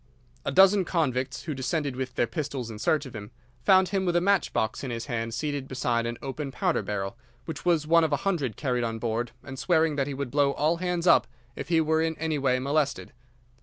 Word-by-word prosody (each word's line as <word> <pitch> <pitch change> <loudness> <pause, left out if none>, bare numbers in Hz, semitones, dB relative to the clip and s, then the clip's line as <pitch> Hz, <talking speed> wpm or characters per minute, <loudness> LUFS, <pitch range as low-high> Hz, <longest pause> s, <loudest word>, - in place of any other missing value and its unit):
"'A - - 0
dozen 195 +1 +6
convicts, 130 -7 -1
who 155 - -3
descended 140 +1 -2
with 130 -1 -4
their - - +2
pistols 135 -6 -4
in 105 - -8
search 150 +5 +1
of 130 - -10
him, 105 -1 -7 0.3
found 185 +8 +5
him 195 -2 0
with 175 -2 0
a - - +5
match 195 -1 +2
box 110 +4 -1
in 135 - -3
his 115 -1 -4
hand 115 -4 -3
seated 140 +2 -3
beside 120 -3 -1
an 120 0 -4
open 135 +1 -4
powder - - 0
barrel, 100 +1 -3 0.3
which 160 -1 -7
was 170 -4 +2
one 165 +1 +5
of 160 - +1
a 145 - +2
hundred 150 - 0
carried 125 -4 -1
on 115 -1 -2
board, 115 +1 -2
and 130 -1 -8
swearing 160 -4 +2
that 135 -1 0
he 140 - -4
would 135 -2 -4
blow 140 -1 +3
all 155 +4 +1
hands 180 -1 -2
up 175 - +5 0.3
if - - -6
he 165 -2 +4
were 160 0 +2
in 160 -1 -1
any 160 -2 -1
way 130 -2 +2
molested. 140 +2 -1
140 Hz, 230 wpm, -27 LUFS, 125-160 Hz, 0.3 s, dozen